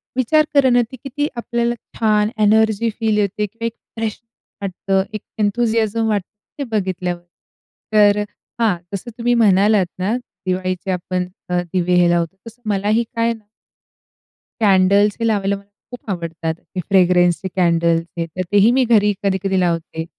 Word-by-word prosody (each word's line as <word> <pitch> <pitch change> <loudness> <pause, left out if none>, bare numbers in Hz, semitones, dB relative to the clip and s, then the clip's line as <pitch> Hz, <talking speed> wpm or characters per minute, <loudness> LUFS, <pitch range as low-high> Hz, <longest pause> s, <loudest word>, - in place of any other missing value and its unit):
विचार 300 +5 +3
करा 280 -2 +5
ना 245 0 +4
ते - - -7
किती 290 +2 -2
आपल्याला 235 0 -1 0.2
छान 210 -1 +2
एनर्जी 220 +1 +3
फील 220 -2 +1
येते 210 0 0
किंवा 230 +3 -7
एक 230 - -2 0.2
फ्रेश 225 -2 -3 0.4
वाटतं 195 0 -1
एक 215 - -4 0.2
एंथुसियाझम 225 +1 +1
वाटतं 205 -4 -1 0.3
ते - - -1
बघितल्यावर. 185 -4 -2 0.7
तर 205 -1 +5 0.4
हां, 220 -5 +3 0.2
जसं 200 +5 -5
तुम्ही 240 0 +1
म्हणालात 205 -3 +4
ना 200 +5 0
दिवाळीचे 185 -5 -4
आपण 180 0 -2 0.2
अ, 180 0 +1
दिवे 180 -1 +1
हे 175 -1 +4
लावतो, 170 +1 0
तसं 230 +2 -12
मलाही 210 +3 +1
काय 230 0 +1
ना 225 -2 -14 1.2
कॅन्डल्स 200 0 +4
हे 230 - 0
लावायला 200 -2 +1
मला 200 - -15 0.3
खूप 245 -3 -10
आवडतात. 165 -2 -3
ते 175 +3 -9
फ्रेग्रन्सचे 180 -1 +3
कॅन्डल्स 170 -2 +2
हे 170 - -1
तर 165 +3 -6
तेही 205 +3 +5
मी 260 +1 +3
घरी 210 -3 +4
कधी-कधी 190 -1 0
लावते. 165 -2 -1
205 Hz, 150 wpm, -19 LUFS, 185-225 Hz, 1.2 s, करा